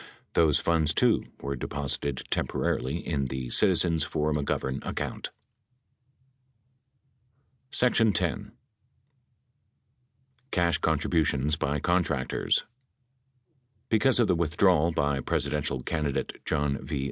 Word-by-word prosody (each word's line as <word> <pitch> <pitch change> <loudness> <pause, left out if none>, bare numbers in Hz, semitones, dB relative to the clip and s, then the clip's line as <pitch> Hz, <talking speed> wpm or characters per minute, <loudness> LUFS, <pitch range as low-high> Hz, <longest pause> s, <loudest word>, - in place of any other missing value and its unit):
Those 80 -4 +4
funds, 80 -2 +1
too, 120 -3 +3 0.2
were 70 0 -3
deposited 70 0 -3
temporarily 65 +6 -1
in 70 -5 -1
the 65 -1 -4
Citizens 85 -5 +3
for 75 +1 -1
McGovern 70 -2 -2
account. - - -4 2.5
X. 125 -2 +3 2.5
CASH 85 - +1
CONTRIBUTIONS 75 -2 +1
BY 75 -1 -1
CONTRACTORS 85 -7 0 1.3
Because 125 +3 +3
of 120 - +5
the 90 - +3
withdrawal 85 0 +3
by 70 -3 0
Presidential 70 0 -1
candidate 75 -4 -3
John 75 -3 -1
V. 75 - -3
75 Hz, 90 wpm, -27 LUFS, 70-85 Hz, 2.5 s, of